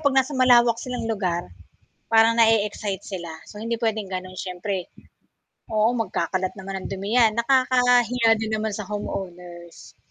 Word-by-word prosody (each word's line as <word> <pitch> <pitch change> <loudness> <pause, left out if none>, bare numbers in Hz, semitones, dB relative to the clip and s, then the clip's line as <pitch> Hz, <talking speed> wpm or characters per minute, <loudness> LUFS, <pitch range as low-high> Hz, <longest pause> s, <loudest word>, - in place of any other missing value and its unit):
'pag 280 -2 +2
nasa 265 +3 +1
malawak 240 -2 +5
silang 250 -2 -4
lugar. 185 -6 -2 0.7
Parang 225 +1 +5
nae-excite 210 -3 +2
sila 175 -4 -6 0.2
so - - -13
hindi 230 0 -3
puwedeng 215 -4 -1
gano'n 185 0 -6
siyempre 185 0 -4 0.9
oo 215 +1 +3
magkakalat 185 -4 -2
naman 190 0 -6
ng - - -3
dumi 200 +5 -2
'yan, 225 -3 +5
nakakahiya 245 -2 +3
din 220 0 -4
naman 220 - -1
sa 210 - -5
home 205 +2 -4
owners. 175 -2 -9
215 Hz, 150 wpm, -23 LUFS, 190-235 Hz, 0.9 s, malawak